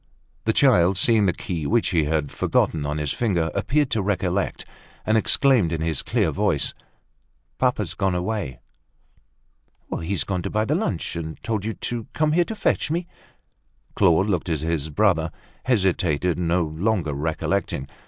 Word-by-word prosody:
The 110 - +3
child, 95 -8 +4
seeing 105 0 +4
the - - +4
key 85 -3 -4
which 120 0 +2
he 80 -5 +2
had 75 -2 -1
forgotten 75 -3 0
on 75 +1 -2
his 75 -2 -1
finger, 85 -9 0
appeared 145 0 0
to 110 - +1
recollect, 95 -1 -1 0.4
and 110 - +2
exclaimed 110 - +4
in 80 -2 -2
his 80 -3 0
clear - - 0
voice: - - 0 0.9
"Papa's - - 0
gone 95 -2 0
away." 90 - -3 1.4
"He's 90 +3 -1
gone 95 -2 -2
to - - -4
buy 110 +1 0
the 145 - 0
lunch, 155 - -2
and 80 -2 -5
told 110 -3 -2
you 110 - -3
to 120 -2 -4
come 155 -1 +1
here 175 +2 +3
to 220 - -5
fetch 205 - 0
me?" 170 +3 -1 0.9
Claude 95 -1 +4
looked 90 -4 -1
at 80 -3 -1
his 80 -2 -1
brother, 80 -1 +2 0.3
hesitated, 90 - +1
no 85 0 +1
longer 80 +1 -1
recollecting. 80 0 -2
90 Hz, 160 wpm, -23 LUFS, 80-110 Hz, 1.4 s, child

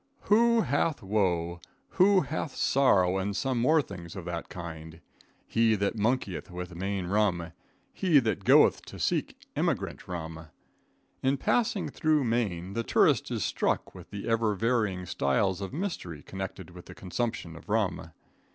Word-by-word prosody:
Who 230 +2 +4
hath 145 - 0
woe? 90 -4 0 0.3
who 190 +1 +4
hath 150 0 -4
sorrow 95 -9 +3
and 100 +1 -2
some 130 +1 0
more 155 +4 +4
things 85 -7 -9
of 95 -3 -7
that 85 -1 -5
kind? 80 -2 -8 0.5
He 115 -1 +3
that 100 +1 -1
monkeyeth 110 -4 -1
with 90 0 -6
Maine 95 +1 -3
rum; 90 -4 +1 0.4
he 180 -6 +3
that 110 -7 -1
goeth - - +5
to - - -9
seek - - -1 0.2
emigrant - - -1
rum. 80 -2 -6 0.7
In 135 +1 +2
passing 225 - +1
through 155 -3 +1
Maine 100 -7 -1
the 115 - -1
tourist - - +3
is - - -1
struck - - -1
with - - -12
the 100 -1 -6
ever 115 -2 +1
varying 105 -4 0
styles 90 +6 0
of 95 - -4
mystery 140 - -4
connected 95 -2 -7
with 90 0 -12
the 90 - -11
consumption 95 -3 -3
of 80 - -13
rum. 105 -6 0
100 Hz, 150 wpm, -28 LUFS, 90-125 Hz, 0.7 s, goeth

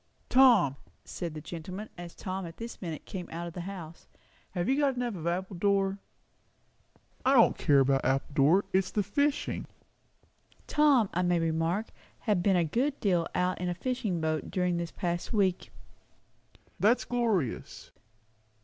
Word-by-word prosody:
"Tom," 230 - +5 0.3
said 170 -3 -5
the 155 - -6
gentleman, 185 +7 -7
as 175 -1 -9
Tom 190 0 -4
at 165 - -11
this 230 +1 -8
minute 165 -5 -5
came 180 -3 -6
out 170 +1 -4
of 170 - -7
the 180 - -5
house, 170 -3 -8 0.4
"have 175 -1 -2
you 265 - +3
got 280 -3 +2
enough 245 -2 -2
of 170 -3 -5
Appledore?" 195 +2 0 1.2
"I 265 - +4
don't 230 - +6
care 140 -3 +4
about 135 0 +2
Appledore. 140 +7 +2
It's 190 0 +2
the 205 - 0
fishing." 285 +9 -1 1.0
Tom, 285 -7 +4
I 180 - +1
may 175 -1 +2
remark, 165 +5 0 0.3
had 210 -6 +1
been 195 +1 +3
a 175 -2 +3
good 265 - -1
deal 175 -5 +1
out 180 0 0
in 180 - -1
a 175 - -2
fishing 215 -4 -2
boat 155 -1 -1
during 180 -2 0
this 170 -1 -3
past 175 +4 -3
week. 190 -4 +1 1.1
"That's 225 +5 +3
glorious." 220 - -2
180 Hz, 155 wpm, -29 LUFS, 170-210 Hz, 1.2 s, don't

